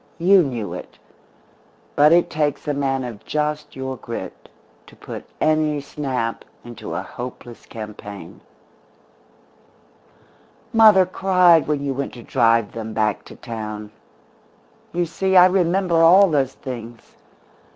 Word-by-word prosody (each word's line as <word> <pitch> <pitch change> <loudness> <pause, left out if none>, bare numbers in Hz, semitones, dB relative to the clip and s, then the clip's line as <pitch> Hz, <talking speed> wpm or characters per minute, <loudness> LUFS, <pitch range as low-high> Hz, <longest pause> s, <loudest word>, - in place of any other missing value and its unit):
You 185 +3 +5
knew 120 -9 -4
it. - - -9 1.0
But 150 +1 +5
it 170 +1 +4
takes 150 -1 -2
a 145 - 0
man 135 -2 -1
of 115 -4 -8
just 150 0 -3
your 130 0 -5
grit 115 -1 -8 0.4
to - - -16
put - - -9
any 155 -1 +1
snap 135 -5 -4 0.2
into 120 -2 -8
a - - -3
hopeless 120 -1 -9
campaign. 105 -5 -9 2.3
"Mother 215 -4 +7
cried 180 -3 +3
when 150 -2 -1
you 140 -1 -2
went 140 +1 -4
to 120 - -11
drive 115 -2 +2
them 110 -1 -6
back 110 -2 -1
to - - -12
town. 110 -3 -7 1.0
You 175 0 -1
see, 190 +3 -1
I 180 - +9
remember 180 -1 +1
all 180 +3 +6
those 135 -3 +1
things. 120 -2 -9
140 Hz, 130 wpm, -21 LUFS, 115-170 Hz, 2.3 s, I